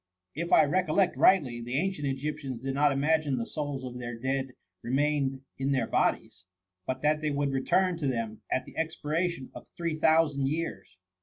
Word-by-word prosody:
" 90 0 -55
If 170 - -6
I - - +7
recollect 180 +3 +2
rightly, 130 -11 +4
the 120 +3 -3
ancient 180 -3 -1
Egyptians 135 -2 -4
did 135 0 -2
not 145 +1 +3
imagine 145 0 +1
the 115 - -2
souls 145 -2 -4
of 125 -1 -6
their 120 -1 -5
dead 130 +1 -2 0.3
re 120 - -5
mained 135 -1 +1 0.2
in 135 +1 +1
their 130 - +1
bodies, 90 - -1 0.4
but 130 +1 -3
that 150 +1 +2
they 155 - 0
would 140 -1 0
return 175 +7 +2
to 150 -4 -2
them 115 -4 -2
at 130 - 0
the - - -13
expiration 160 -1 -2
of - - -11
three 170 -2 -1
thou 160 +1 +5
sand 140 -3 -2
years. 155 - -4
140 Hz, 190 wpm, -29 LUFS, 130-155 Hz, 0.4 s, I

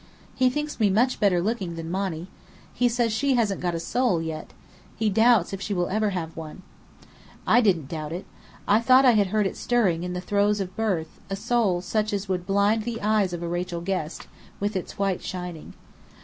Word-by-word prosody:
He 255 -1 +3
thinks 295 +2 -4
me 210 -2 +4
much 240 +7 +2
better 185 -5 +3
looking 195 -5 -2
than 165 0 -6
Monny. 185 -3 -2 0.5
He 245 0 +2
says 235 -1 +1
she 270 +4 +1
hasn't 215 -5 0
got 175 -1 -1
a - - -2
soul, 220 +1 +1
yet. 160 -1 -5 0.5
He 220 -2 0
doubts 220 -3 +4
if 195 - -5
she 200 0 -2
ever 185 +5 0
will - - +2
have 165 -4 -4
one." 165 +3 -8 0.8
I 245 - +5
didn't 175 - +2
doubt 155 0 -5
it. 175 +3 -5 0.4
I 205 +2 +5
thought 255 +2 +6
I 250 - +8
had 210 -4 +3
heard 210 +2 +1
it 190 - -2
stirring 205 -9 +1
in 180 0 -4
the 180 - -3
throes 205 +2 +1
of 185 -1 -4
birth, 185 -8 -2
a 195 - -2
soul 210 -4 +1
such 215 +3 -1
as 200 0 -2
would 180 -1 -2
blind 200 +3 +2
the 230 +1 -4
eyes 210 -3 +2
of 175 -1 -5
a - - -2
Rachel 175 0 -3
Guest, 175 -3 -3 0.3
with 205 +1 -2
its 185 - -4
white 195 -2 0
shining. 180 -3 -6
195 Hz, 205 wpm, -25 LUFS, 175-220 Hz, 0.8 s, I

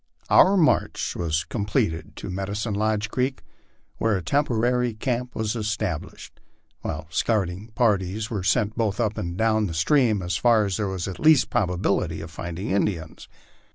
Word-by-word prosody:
Our 195 +2 +7
inarch 165 -4 +1
was 80 -2 -1
completed 90 -7 -2
to - - -6
Medicine 100 +4 -3
Lodge 105 +1 0
creek, 130 +1 -1 0.5
where 110 -3 +1
a 90 - -5
temporary 125 - +1
camp 125 +2 -2
was 110 0 -1
established, 105 -7 -4 0.4
while 80 0 -5
scouting 100 0 0
parties 105 -2 +1
were 110 -5 -3
sent 105 +3 +1
both 110 -2 -1
up 110 -3 0
and 85 +1 -4
down 110 -1 +2
the 80 - -5
stream 110 - +2
as 90 -2 -1
far 115 +1 +4
as 100 -2 -2
there 105 -2 -1
was 95 -2 -3
the 95 - -6
least 155 -3 +5
probability 90 -3 0
of 80 0 -8
finding 85 +5 -5
Indians. 90 -5 -2
105 Hz, 155 wpm, -24 LUFS, 90-115 Hz, 0.5 s, Our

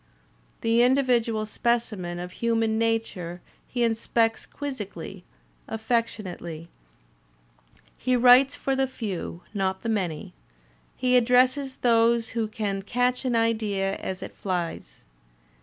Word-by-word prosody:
The 230 +1 +3
individual 245 -4 +2
specimen 215 -6 -1
of 180 +1 -6
human 225 0 0
nature 220 -7 -1 0.3
he 245 -1 -1
inspects 225 0 +1
quizzically, 200 - -6 0.4
affectionately. 210 -8 -3 1.3
He 255 0 +1
writes 250 +2 +6
for 270 - -1
the 265 0 +1
few, 200 -8 -5
not 190 -2 -1
the 230 - -2
many; 180 -8 -2 0.6
he 250 0 +2
addresses 255 +3 +3
those 230 -1 +3
who 225 -1 -1
can 205 -2 -3
catch 250 +5 0
an 245 -2 +1
idea 215 -4 +1
as 185 -1 -5
it - - -8
flies. 175 - -4
225 Hz, 110 wpm, -26 LUFS, 195-245 Hz, 1.3 s, writes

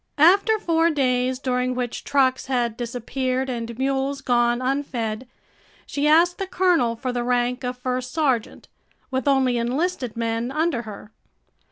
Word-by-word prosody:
After 395 +8 +5
four 335 -5 +2
days, 255 -4 +1
during 255 -1 -1
which 245 -2 -3
trucks 260 -2 +1
had 240 -4 0
disappeared 255 +2 -2
and 235 -1 -5
mules 270 +1 -1
gone 240 -2 +2
unfed, 255 -3 -2 0.6
she 290 +1 -1
asked 335 +3 +4
the 390 - -2
colonel 350 -12 +2
for 255 +2 -3
the 245 -1 -2
rank 245 +1 0
of 250 0 -3
first 250 0 -3
sergeant, 265 -8 -1 0.4
with 260 0 -2
only 265 -3 +3
enlisted 255 0 -2
men 230 +1 -1
under 305 -4 0
her. 210 -1 -10
255 Hz, 145 wpm, -23 LUFS, 240-280 Hz, 0.6 s, After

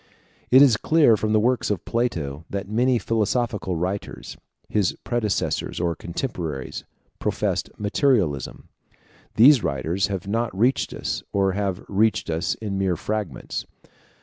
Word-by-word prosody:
It 130 +2 +8
is 125 -6 +5
clear 150 -3 +4
from 110 0 -1
the 110 - +4
works 125 +3 +1
of 105 -5 -2
Plato, 85 - -2
that 100 0 -4
many 120 +4 +2
philosophical 110 -4 -1
writers, 95 +4 -4 0.3
his 100 -4 +1
predecessors 115 -4 -1
or 85 -1 0
contemporaries, 85 - -5 0.4
professed - - -1
materialism. 100 - 0 0.7
These 130 +3 +7
writers 75 +8 0
have 95 -2 -4
not 115 -1 -1
reached 125 +6 +2
us, - - -3
or 95 -1 +2
have 100 -1 -2
reached 105 -3 +1
us 80 +4 -1
in 100 -3 -4
mere 95 -2 +1
fragments. 105 +2 -4
105 Hz, 130 wpm, -23 LUFS, 90-115 Hz, 0.7 s, It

